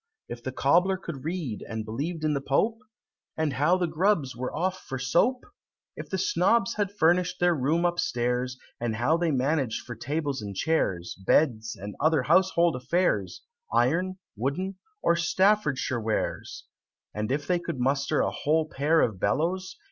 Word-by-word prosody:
If 120 Hz, -, -7 dB
the 130 Hz, -, -4 dB
Cobbler 175 Hz, +9 st, +3 dB
could 165 Hz, -8 st, -7 dB
read, 160 Hz, -, -3 dB
and 110 Hz, -1 st, -4 dB
believed 150 Hz, +9 st, -4 dB
in 155 Hz, -1 st, +2 dB
the 140 Hz, -, -1 dB
Pope? 215 Hz, +12 st, +1 dB, 0.6 s
And 155 Hz, -3 st, 0 dB
how 150 Hz, +8 st, +3 dB
the 180 Hz, -, +1 dB
Grubbs 165 Hz, -4 st, +1 dB
were 125 Hz, +2 st, -4 dB
off 185 Hz, +4 st, -1 dB
for 130 Hz, -, -5 dB
soap? 170 Hz, -, +1 dB, 0.5 s
If -, -, -8 dB
the -, -, -1 dB
Snobbs 235 Hz, -, +2 dB
had 205 Hz, -2 st, -1 dB
furnish'd 180 Hz, +1 st, +2 dB
their 175 Hz, 0 st, +4 dB
room 160 Hz, +4 st, +1 dB
upstairs, 125 Hz, -7 st, 0 dB, 0.2 s
And 115 Hz, -2 st, -2 dB
how 125 Hz, +8 st, +2 dB
they 170 Hz, -1 st, 0 dB
managed 135 Hz, -3 st, 0 dB
for 120 Hz, -, -6 dB
tables 140 Hz, +3 st, -3 dB
and 100 Hz, -2 st, -6 dB
chairs, 95 Hz, -, 0 dB
Beds, 115 Hz, -2 st, +2 dB
and 100 Hz, +1 st, -6 dB
other 155 Hz, -2 st, +3 dB
household 170 Hz, +1 st, +3 dB
affairs, 125 Hz, -, 0 dB, 0.3 s
Iron, 180 Hz, +9 st, +1 dB, 0.2 s
wooden, 180 Hz, -, -3 dB, 0.2 s
and 170 Hz, -, +3 dB
Staffordshire 170 Hz, -, +2 dB
wares? 110 Hz, 0 st, -3 dB, 0.5 s
And 105 Hz, +3 st, -3 dB
if 145 Hz, +1 st, -1 dB
they 180 Hz, +1 st, +1 dB
could 140 Hz, -, -5 dB
muster 140 Hz, +3 st, +1 dB
a -, -, 0 dB
whole 155 Hz, +1 st, +1 dB
pair 155 Hz, +2 st, +2 dB
of 105 Hz, -5 st, 0 dB
bellows? 170 Hz, -, -1 dB
150 Hz, 165 wpm, -27 LUFS, 125-175 Hz, 0.6 s, their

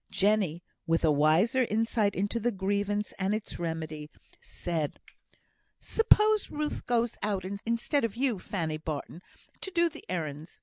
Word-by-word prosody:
Jenny, 195 Hz, -5 st, +2 dB, 0.2 s
with 165 Hz, 0 st, +2 dB
a 155 Hz, -, +5 dB
wiser 160 Hz, -, +4 dB
insight 220 Hz, -1 st, +1 dB
into 205 Hz, +5 st, 0 dB
the 235 Hz, +2 st, +1 dB
grievance 200 Hz, +1 st, -1 dB
and 195 Hz, +2 st, +1 dB
its 215 Hz, -, -6 dB
remedy, 160 Hz, -3 st, -4 dB, 0.3 s
said: 160 Hz, -4 st, -3 dB, 0.8 s
"Suppose 430 Hz, -1 st, +4 dB
Ruth 300 Hz, 0 st, -3 dB
goes 235 Hz, -1 st, +1 dB
out 200 Hz, -3 st, -1 dB
instead 230 Hz, +8 st, -1 dB
of 230 Hz, -2 st, -1 dB
you, 245 Hz, -5 st, +1 dB
Fanny 165 Hz, -5 st, -2 dB
Barton, 155 Hz, +2 st, -5 dB, 0.4 s
to -, -, -5 dB
do 340 Hz, -2 st, +2 dB
the 315 Hz, 0 st, -12 dB
errands. 155 Hz, -2 st, -4 dB
200 Hz, 140 wpm, -29 LUFS, 165-230 Hz, 0.8 s, a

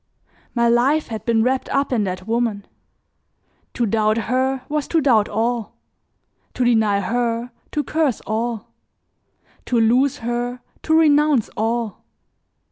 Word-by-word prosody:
My 235 Hz, -1 st, +3 dB
life 260 Hz, +6 st, +2 dB
had 220 Hz, -2 st, -6 dB
been 225 Hz, -2 st, +2 dB
wrapped 260 Hz, +2 st, 0 dB
up 275 Hz, -1 st, 0 dB
in 215 Hz, -4 st, +1 dB
that 185 Hz, 0 st, -5 dB
woman; 225 Hz, -3 st, -1 dB, 1.1 s
to 240 Hz, -, +1 dB
doubt 215 Hz, 0 st, +1 dB
her 255 Hz, +3 st, 0 dB
was 300 Hz, -1 st, -2 dB
to 330 Hz, -, +2 dB
doubt 235 Hz, -8 st, +3 dB
all; 230 Hz, +1 st, -2 dB, 0.8 s
to 250 Hz, -, 0 dB
deny 220 Hz, -4 st, +3 dB
her, 235 Hz, +3 st, -1 dB, 0.2 s
to 295 Hz, -, -1 dB
curse 305 Hz, -6 st, 0 dB
all; 225 Hz, 0 st, -3 dB, 0.9 s
to 240 Hz, -, +2 dB
lose 245 Hz, +5 st, +3 dB
her, 240 Hz, +1 st, -3 dB, 0.2 s
to 315 Hz, 0 st, +2 dB
renounce 300 Hz, -5 st, +3 dB
all. 225 Hz, -1 st, -2 dB
240 Hz, 130 wpm, -21 LUFS, 225-260 Hz, 1.1 s, My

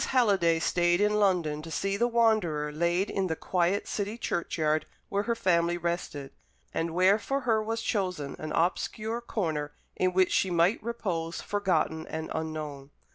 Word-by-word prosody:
Halliday 200 Hz, -10 st, +3 dB
stayed 175 Hz, +1 st, +2 dB
in 210 Hz, +1 st, +2 dB
London 175 Hz, -7 st, +1 dB
to 165 Hz, -, -9 dB
see 195 Hz, +5 st, -1 dB
the 235 Hz, +4 st, +2 dB
wanderer 215 Hz, -11 st, +2 dB
laid 170 Hz, +5 st, 0 dB
in 195 Hz, -1 st, 0 dB
the 160 Hz, -, -1 dB
quiet 180 Hz, +4 st, 0 dB
city 205 Hz, +2 st, -3 dB
churchyard 155 Hz, -7 st, -1 dB, 0.2 s
where 200 Hz, -, +1 dB
her 235 Hz, -, +2 dB
family 175 Hz, -4 st, +2 dB
rested, 170 Hz, -5 st, -3 dB, 0.4 s
and 165 Hz, 0 st, -2 dB
where 190 Hz, +4 st, +5 dB
for 275 Hz, +6 st, -2 dB
her 225 Hz, -4 st, +2 dB
was 225 Hz, +1 st, -3 dB
chosen 180 Hz, -11 st, -2 dB
an 155 Hz, 0 st, -5 dB
obscure 215 Hz, +6 st, -1 dB
corner 160 Hz, -10 st, -2 dB, 0.2 s
in 185 Hz, 0 st, +1 dB
which 185 Hz, 0 st, +3 dB
she 190 Hz, -, +2 dB
might 175 Hz, +4 st, +2 dB
repose 180 Hz, -8 st, -3 dB
forgotten 170 Hz, -6 st, 0 dB
and 160 Hz, 0 st, -5 dB
unknown. 155 Hz, -3 st, -5 dB
180 Hz, 160 wpm, -28 LUFS, 160-205 Hz, 0.4 s, where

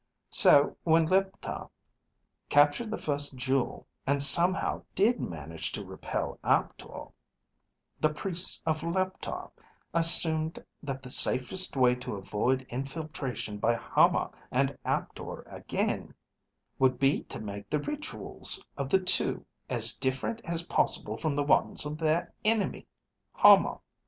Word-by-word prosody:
So 145 Hz, 0 st, +6 dB
when 165 Hz, 0 st, +3 dB
Leptar 190 Hz, +3 st, -2 dB, 0.8 s
captured 145 Hz, +10 st, +2 dB
the 220 Hz, -, -4 dB
first 145 Hz, -2 st, +1 dB
jewel, 130 Hz, 0 st, -2 dB, 0.2 s
and 140 Hz, +1 st, +1 dB
somehow 175 Hz, +5 st, +2 dB
did 230 Hz, +5 st, +2 dB
manage 80 Hz, 0 st, -5 dB
to -, -, -5 dB
repel -, -, -6 dB
Aptor, -, -, -2 dB, 0.9 s
the 155 Hz, -, +2 dB
priests 175 Hz, +4 st, -1 dB
of 155 Hz, -1 st, -1 dB
Leptar 185 Hz, +2 st, -4 dB, 0.4 s
assumed 165 Hz, -1 st, +4 dB, 0.2 s
that 135 Hz, -3 st, -6 dB
the 125 Hz, -, -9 dB
safest 145 Hz, +8 st, +4 dB
way 125 Hz, -1 st, +4 dB
to 125 Hz, -3 st, -7 dB
avoid 105 Hz, +7 st, -2 dB
infiltration 130 Hz, -5 st, -6 dB
by 120 Hz, +3 st, +1 dB
Hama -, -, +1 dB, 0.2 s
and 135 Hz, +2 st, -1 dB
Aptor -, -, -5 dB
again -, -, -4 dB, 0.6 s
would 130 Hz, -1 st, +2 dB
be 135 Hz, +2 st, +1 dB
to -, -, -7 dB
make 100 Hz, -2 st, -8 dB
the 150 Hz, -, 0 dB
rituals 300 Hz, -, -1 dB
of 140 Hz, -1 st, -4 dB
the 190 Hz, -, +3 dB
two 185 Hz, 0 st, +2 dB, 0.2 s
as -, -, +3 dB
different 130 Hz, -, -3 dB
as 170 Hz, 0 st, -1 dB
possible -, -, 0 dB
from 155 Hz, -4 st, -3 dB
the 145 Hz, -, 0 dB
ones 145 Hz, -, +1 dB
of 150 Hz, +1 st, -6 dB
their 160 Hz, +1 st, -1 dB
enemy, 215 Hz, -2 st, +1 dB, 0.5 s
Hama. -, -, +5 dB
145 Hz, 125 wpm, -28 LUFS, 130-170 Hz, 0.9 s, So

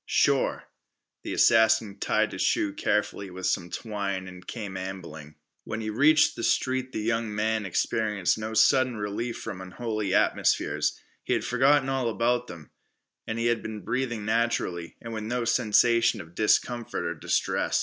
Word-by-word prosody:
"Sure." -, -, +2 dB, 0.6 s
The -, -, -5 dB
assassin 110 Hz, -2 st, +4 dB
tied -, -, +1 dB
his -, -, -5 dB
shoe 100 Hz, -, +1 dB
carefully 100 Hz, -1 st, -1 dB
with 95 Hz, 0 st, -7 dB
some 85 Hz, -, 0 dB
twine 100 Hz, -4 st, -4 dB
and 90 Hz, -1 st, -12 dB
came 105 Hz, -5 st, -6 dB
ambling. 85 Hz, -6 st, -7 dB, 0.3 s
When 110 Hz, -, -5 dB
he 110 Hz, 0 st, -3 dB
reached 150 Hz, +7 st, +4 dB
the -, -, -6 dB
street 130 Hz, +1 st, 0 dB
the 110 Hz, -, -3 dB
young 115 Hz, -1 st, -1 dB
man 110 Hz, -1 st, 0 dB
experienced 105 Hz, 0 st, 0 dB
no 110 Hz, +1 st, -5 dB
sudden 130 Hz, +2 st, +4 dB
relief 105 Hz, +3 st, -3 dB
from 95 Hz, -, -6 dB
unholy 110 Hz, +1 st, -3 dB
atmospheres. -, -, +1 dB, 0.2 s
He -, -, 0 dB
had -, -, -1 dB
forgotten 135 Hz, +3 st, +3 dB
all 135 Hz, -3 st, 0 dB
about 120 Hz, +2 st, 0 dB
them, 75 Hz, -3 st, -11 dB, 0.6 s
and 110 Hz, -, -3 dB
had 120 Hz, 0 st, +1 dB
been 110 Hz, -1 st, -6 dB
breathing 120 Hz, -4 st, -2 dB
naturally, 110 Hz, -7 st, -1 dB
and 115 Hz, 0 st, -8 dB
with 110 Hz, -, -4 dB
no 120 Hz, +1 st, -2 dB
sensation 115 Hz, 0 st, +3 dB
of 80 Hz, -3 st, -11 dB
discomfort 115 Hz, +3 st, 0 dB
or -, -, -1 dB
distress. -, -, 0 dB
110 Hz, 160 wpm, -27 LUFS, 100-120 Hz, 0.6 s, assassin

